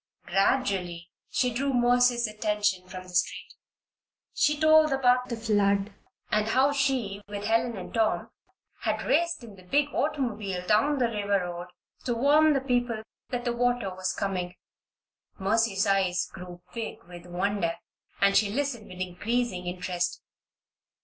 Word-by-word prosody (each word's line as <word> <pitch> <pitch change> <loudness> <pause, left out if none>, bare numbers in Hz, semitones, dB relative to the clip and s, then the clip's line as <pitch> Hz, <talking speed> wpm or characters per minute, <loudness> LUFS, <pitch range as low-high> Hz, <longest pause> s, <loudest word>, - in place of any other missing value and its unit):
Gradually 190 -5 0 0.2
she 250 -2 +1
drew 270 +2 0
Mercy's 245 0 +4
attention 210 -3 -1
from 185 -1 -7
the 180 -1 -13
street. 175 - -1 0.8
She 295 0 +2
told 315 0 +6
about 250 -2 +3
the 235 - -3
flood, 205 -2 +1 0.4
and 215 0 +2
how 265 +5 +3
she, 260 -8 0
with 205 0 -5
Helen 230 0 +1
and 185 - -8
Tom, 225 -2 0 0.5
had - - -1
raced 335 -5 +1
in 215 -4 -11
the - - -14
big 285 +11 +1
automobile 215 -11 -2
down 220 +9 +3
the 250 - +2
river 205 -3 0
road 175 0 -6 0.4
to 240 - 0
warn 295 +5 +5
the 275 - +1
people 245 -4 0 0.3
that 245 -1 -3
the 240 - 0
water 245 -5 0
was 185 0 -2
coming. 185 -2 -3 0.8
Mercy's 205 0 +1
eyes 190 -3 +1
grew 180 -1 -10
big 230 -2 -5
with 175 0 -12
wonder 180 -1 -1 0.4
and 200 0 +4
she 205 -1 +4
listened 250 -1 -2
with 180 0 -9
increasing 185 +1 -2
interest. 180 0 -2
215 Hz, 145 wpm, -27 LUFS, 185-245 Hz, 0.8 s, told